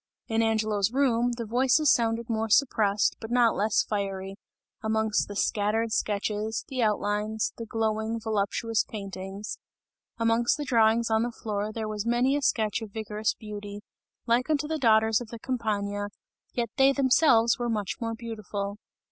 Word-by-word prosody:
In 225 -1 +1
Angelo's 215 -2 +1
room, 245 -3 +2
the 235 -1 -4
voices 260 +6 +3
sounded 230 0 0
more 225 -1 -1
suppressed 210 -5 +2
but 225 - -7
not 240 -1 +3
less 210 +1 +2
fiery, 195 -2 -3 0.5
amongst 220 -1 +1
the 205 - -7
scattered 220 +2 0
sketches, 210 +1 -1
the 260 -2 -2
outlines, 210 0 0
the 230 - -6
glowing, 220 0 -1
voluptuous 220 +1 0
paintings; 195 0 -7 0.6
amongst 230 +2 +2
the 295 - -4
drawings 230 -2 +3
on 220 0 +3
the 240 +1 -1
floor 210 -2 -3
there 220 0 -4
was 210 -1 -3
many 240 +4 +2
a 290 - 0
sketch 220 -4 +1
of 220 - -6
vigorous 215 0 -2
beauty, 205 -1 -8 0.4
like 240 +4 +1
unto 300 -1 +1
the 315 0 -2
daughters 220 -2 +4
of 240 - -7
the 235 - -8
Campagna, 205 -4 -2 0.5
yet 235 -3 -2
they 270 0 +6
themselves 255 -4 +4
were 240 0 -1
much 210 -4 -2
more 230 -1 -2
beautiful. 210 -3 -5
220 Hz, 155 wpm, -27 LUFS, 210-235 Hz, 0.6 s, they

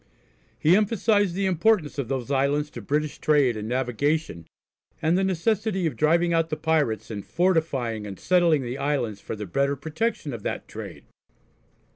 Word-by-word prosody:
He 165 +4 +4
emphasised 205 -2 +2
the 195 +1 0
importance 185 -4 +2
of 135 - -2
those 135 -1 -3
islands 140 +2 +1
to 120 - -8
British 150 +7 -2
trade 145 -6 +3
and 105 0 -5
navigation, 130 - -1 0.5
and 165 +1 +2
the 190 - +2
necessity 190 +1 0
of 160 - -1
driving 170 +3 +2
out 165 0 +1
the 155 - -2
pirates 145 -10 0
and 100 -2 -5
fortifying 140 - 0
and 95 -2 -8
settling 170 -6 +3
the 125 +3 -5
islands 135 -8 -1
for - - -5
the 105 0 -6
better 140 +9 0
protection 160 - -3
of 115 - -6
that - - -4
trade. - - -9
150 Hz, 165 wpm, -25 LUFS, 125-170 Hz, 0.5 s, He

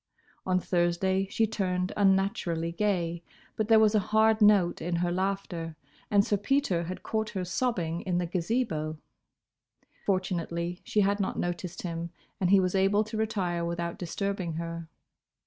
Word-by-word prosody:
On 185 0 +3
Thursday 185 +2 +1
she 225 - +2
turned 185 -3 -1
unnaturally 195 -4 +1
gay, 170 -3 -1 0.3
but 215 - -1
there 225 0 +6
was 220 -1 +5
a 215 - +4
hard 220 +2 +3
note 205 -4 +5
in 170 +2 -1
her 175 +1 0
laughter, 180 -3 -2 0.3
and 200 0 +4
Sir 205 - +1
Peter 205 -6 +1
had 185 +2 -6
caught 220 -1 -1
her 185 -3 -3
sobbing 175 -4 -1
in 180 -2 -1
the 175 - 0
Gazebo. 170 -3 -1 1.1
Fortunately 175 -2 -1
she 210 - +1
had 200 +1 +2
not 195 - -1
noticed 175 0 -3
him, 170 -1 -4 0.3
and 185 - +1
he 200 0 +7
was 185 -1 +1
able 195 +2 +3
to 215 +1 -8
retire 195 -6 -1
without 170 0 -3
disturbing 185 0 -2
her. 165 0 -5
185 Hz, 155 wpm, -28 LUFS, 170-205 Hz, 1.1 s, he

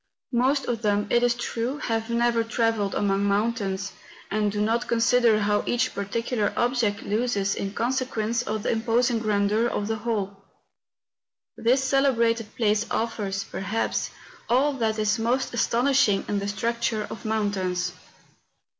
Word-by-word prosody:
Most 260 +3 +2
of 235 -2 -2
them, 205 -1 +1
it 240 - +4
is 245 -1 +3
true, 240 +2 -3
have 225 -5 -2
never 235 0 +2
tra¬ 225 0 +1
velled 205 -3 -2
among 200 -1 +1
mountains, 200 -1 0 0.4
and 210 0 +1
do 205 - -3
not 225 +3 +1
consider 235 -1 +3
how 205 0 +2
each 240 - +1
particular 215 +2 -1
object 240 -4 +1
loses 205 -2 0
in 195 - -3
consequence 235 -2 -1
of 215 -3 -3
the - - +1
imposing 230 +1 +1
grandeur 210 +1 +1
of 205 -3 -2
the 220 0 -1
whole. 205 -3 -3 1.1
This 255 +4 +2
celebrated 235 -5 +1
place 215 -1 +1
offers, 205 -4 -2
perhaps, 200 +4 -2 0.4
all 270 +5 +3
that 225 -4 -1
is 215 +1 +1
most 245 +4 0
astonishing 240 -3 +2
in 205 - 0
the 200 - -3
structure 225 +1 -1
of - - -8
mountains. 190 -5 -1
225 Hz, 145 wpm, -25 LUFS, 205-240 Hz, 1.1 s, it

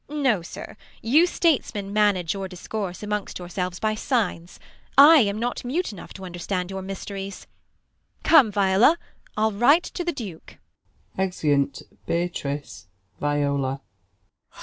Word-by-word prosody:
Beat. 300 - -7
No, 260 -10 +2
sir, 170 - -9 0.3
you 300 +10 +5
Statesmen 240 - 0
manage 205 -5 +2
your 195 -1 -4
discourse 185 +1 -5
Amongst 210 -1 -3
yourselves 180 0 -4
by 215 0 0
signs. 210 -7 -2 0.4
I 300 +4 +10
am 205 -6 +2
not 240 +2 -3
mute 295 +7 -2
Enough 200 - -11
to 190 - -10
underetand 180 +1 -4
your 190 0 -4
mysteries. 195 0 -6 0.8
Come, 275 -10 +6
Viola, 200 - +4 0.4
Til 220 +1 +2
write 250 - +4
to 355 - -5
the 345 - 0
Duke 210 - -9 0.6
I 190 - +3
[Exeuni 145 -6 0 0.2
Beatrice, 150 - -3 0.3
Viola. 140 -2 0
195 Hz, 130 wpm, -24 LUFS, 175-235 Hz, 0.8 s, I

